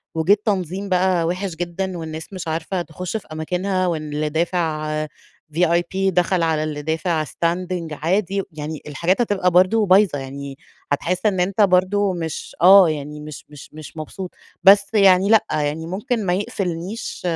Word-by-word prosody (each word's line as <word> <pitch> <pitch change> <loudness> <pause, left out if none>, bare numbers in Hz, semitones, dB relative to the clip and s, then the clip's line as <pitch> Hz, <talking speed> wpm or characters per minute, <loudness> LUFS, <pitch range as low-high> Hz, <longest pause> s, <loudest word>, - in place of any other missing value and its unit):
وجيه 160 +5 +4
التنظيم 195 -2 -2
بقى 180 -2 +2
وحش 180 0 -3
جدًا، 175 +2 -4
والناس 160 +3 -7
مش 185 -3 -6
عارفة 165 +3 -2
تخشّ 180 +5 -5
في 210 - -12
أماكنها، 185 +4 -1
واللي 155 -2 -2
دافع 160 -1 -1 0.7
VIP 170 0 +2 0.2
دخل 180 0 +1
على 155 -1 +1
اللي 150 -1 -4
دافع 160 +1 -1
standing 175 +2 -2
عادي، 190 +6 -1
يعني 155 0 -6
الحاجات 170 - 0
هتبقى 190 -5 +1
برضو 185 +5 +4
بايظة، 185 -5 +4
يعني 135 0 -7 0.3
هتحسّ 180 +6 -1
إنّ 195 -4 +2
أنت 195 +4 +1
برضو 190 +1 +3
مش 165 -3 -5
آه، 190 -1 +8
يعني 150 0 -5
مش 150 -1 -9
مش 145 -2 -12
مش 155 +1 -11
مبسوط، 180 +4 -6 0.3
بس 200 +3 +6
يعني 195 -1 +5
لأ، 220 -1 +5
يعني 150 +2 -1
ممكن 215 +4 -2
ما 180 - +1
يقفّلنيش 190 +1 -4
175 Hz, 150 wpm, -21 LUFS, 160-190 Hz, 0.7 s, آه